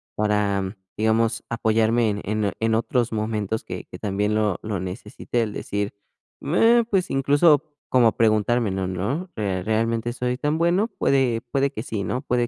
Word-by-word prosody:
para 105 -2 0 0.2
digamos, 110 +1 +1
apoyarme 115 0 +2
en 105 0 -2
en 105 -1 0
en 115 0 +1
otros 120 +1 0
momentos, 110 0 -2
que - - -6
que - - -11
también, 105 +1 -1
lo 105 -3 +1
lo 105 -3 -3
necesite. 95 +5 -3
El 105 -2 -4
decir: 100 0 -3 0.5
"Meh", 225 +10 +4
pues, 190 -4 0
incluso, 145 +2 +4 0.3
como 120 -3 +4
preguntarme: 115 -1 +2
"No, 95 -1 -2
no, 125 - -3
eh, 95 -4 -1
¿realmente 115 +1 0
soy 125 0 -2
tan 150 +2 0
bueno?". 175 +6 +2
Puede 130 - +1
puede 140 0 +2
que 110 - -5
sí, 110 -5 -3
¿no? 125 +5 -2
Puede 125 -3 0
115 Hz, 165 wpm, -23 LUFS, 105-125 Hz, 0.5 s, Meh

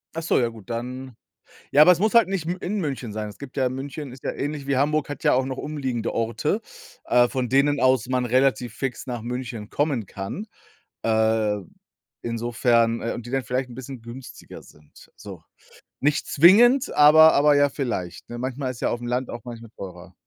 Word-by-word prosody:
Ach 165 - -3
so, 165 - +1
ja 120 - +1
gut, 115 -1 -14
dann 125 +1 -5 0.6
Ja, 145 - +6
aber 180 - +7
es 170 - -5
muss 215 +2 +1
halt 235 -1 +6
nicht 190 -4 -3
m 180 +2 -2
in 205 +3 -3
München 135 -7 -4
sein. 105 0 -4
Es 100 - -13
gibt 140 -2 -10
ja 130 -2 +1
München 135 +2 -6
ist 130 +1 -13
ja - - -1
ähnlich 145 -1 -4
wie 140 - +1
Hamburg, 150 +2 +1
hat 145 -2 -7
ja - - +4
auch 130 +1 +2
noch 130 -1 -5
umliegende 130 -6 -3
Orte, 120 - -1 0.4
äh, 120 0 +4
von 130 -2 -2
denen 140 +3 +2
aus 130 -2 +3
man 125 -1 0
relativ 125 -1 +1
fix 135 0 -4
nach 120 -3 -4
München 120 -2 -6
kommen 140 -7 -1
kann. 100 - -6 0.6
Äh, 110 -2 +1 0.6
insofern 115 0 +1
äh, 115 - -2
und 120 - -7
die 120 - -8
dann 135 -1 0
vielleicht 125 +1 -2
'n 120 - -10
bisschen 130 -2 -8
günstiger 120 +3 -11
sind, 75 -1 -19
so. - - -11 0.6
Nicht 145 +1 +1
zwingend, 240 - +5
aber 155 +2 +8
aber 145 +1 +4
ja 145 0 +4
vielleicht, 120 - -4
ne? 120 - -6
Manchmal 130 +1 -3
ist 120 - -11
ja - - +1
aufm 120 0 -4
Land 125 +1 -2
auch 120 - -7
manchmal 115 -2 -9
teurer. 90 -1 -10
130 Hz, 200 wpm, -24 LUFS, 115-145 Hz, 0.6 s, aber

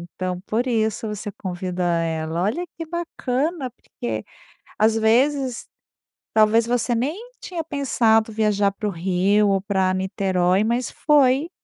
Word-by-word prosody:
Então, 185 -1 -3
por 230 +6 -1
isso, 220 -2 0
você 210 0 -5
convidou 180 -1 -4
ela. 165 -1 -1
Olha, 230 - -1
que 330 - -5
bacana, 310 -4 -2
porque, 110 - -6 0.5
às 220 +1 +3
vezes, 255 +3 +2 0.7
talvez, 220 +2 +4
você 240 0 0
nem 270 - -1 0.2
tinha 340 -3 -4
pensado 230 -7 +2
viajar 210 -2 +1
para 210 +2 -4
o - - -1
Rio, 190 +4 +2
ou 195 -1 +2
pra 190 -2 +1
Niterói. 190 0 +1
Mas, 235 +3 -1
foi 285 +1 +3
220 Hz, 135 wpm, -22 LUFS, 190-255 Hz, 0.7 s, talvez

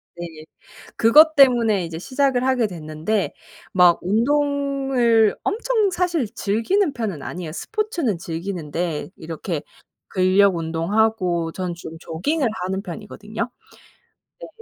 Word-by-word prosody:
네. 165 -2 -8 0.5
그것 310 +8 +6
때문에 235 -8 +4
이제 165 -1 -6
시작을 260 +3 0
하게 250 -4 +2
됐는데 165 +4 -3 0.4
막 180 -2 +5
운동을 270 -1 +2
엄청 440 -1 +1
사실 345 -7 0
즐기는 245 - 0
편은 210 - -4
아니에요. 170 -3 -6
스포츠는 345 - -2
즐기는데 165 -2 -4
이렇게 160 0 -5 0.5
근력 185 0 +3
운동하고 170 +1 0
저는 180 -2 -3
좀 165 -1 -9
조깅을 255 - -1 0.2
하는 190 +1 -2
편이거든요. 215 +4 -6 0.9
네. - - -7
210 Hz, 265 characters per minute, -22 LUFS, 175-270 Hz, 0.9 s, 그것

